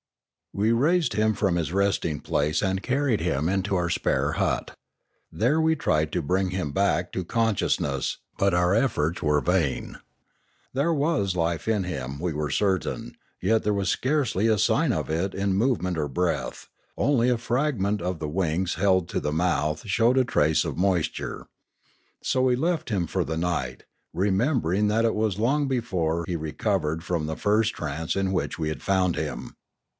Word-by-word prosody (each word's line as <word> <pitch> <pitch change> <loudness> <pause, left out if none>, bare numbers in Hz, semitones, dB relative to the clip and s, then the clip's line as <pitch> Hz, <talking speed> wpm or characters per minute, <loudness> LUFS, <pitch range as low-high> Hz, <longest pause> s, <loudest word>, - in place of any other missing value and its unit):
We 110 +3 +2
raised 160 +8 +2
him 110 0 +2
from 95 -5 +1
his 85 -2 -1
resting 95 -6 0
place 75 +2 0
and 95 -1 0
carried 130 - +1
him 80 -3 0
into 95 +1 0
our 90 -2 0
spare 75 -4 0
hut. - - -1 0.6
There 135 +9 +2
we 160 0 +3
tried 80 - +1
to 90 - -1
bring 95 +5 +1
him 90 -5 -3
back 90 0 +1
to 95 - -2
consciousness, 90 - 0 0.2
but 100 -1 +2
our 90 +1 +3
efforts 100 - +1
were 75 -2 +2
vain. 85 -6 -1 0.7
There 140 +6 +1
was 145 - 0
life 85 +1 -1
in 105 -3 +1
him, 70 -6 -5
we 85 0 -2
were 75 0 -2
certain; 95 -6 -1 0.2
yet 110 +4 +2
there 105 0 +1
was 100 -2 0
scarce) 135 +1 +1
v 100 +4 +1
a 110 -1 +3
sign - - +2
of - - -2
it 85 +5 -1
in 95 0 0
movement 95 -5 +1
or 75 -2 -1
breath, 75 -4 -2 0.3
only 125 -4 +2
a 125 - +2
fragment 115 -4 0
of 90 0 -2
7io - - -12
Limanora - - -19
the 75 - -3
wings 85 +2 0
held 95 0 +2
to - - -1
the 75 - -1
mouth 75 -1 0
showed 115 +5 +3
a 130 - +4
trace 80 -10 +2
of - - -4
moisture. 90 -3 -1 0.8
So 130 - +1
we 130 -1 +3
left 165 0 -1
him 95 -6 0
for - - -1
the 80 - -3
night, 80 -7 -2 0.3
remembering 100 - +1
that 110 +2 +2
it 115 - +2
was 105 -2 0
long 140 +6 +2
before 90 -10 -1
he 90 - -2
recovered 80 0 -1
from 85 -3 -2
the 80 - -4
first 105 +2 +2
trance 80 +1 -3
in 95 -1 0
which 90 - -2
we 80 - -1
had 75 -5 -5
found 95 -3 +1
him. - - -5
95 Hz, 180 wpm, -25 LUFS, 80-110 Hz, 0.8 s, a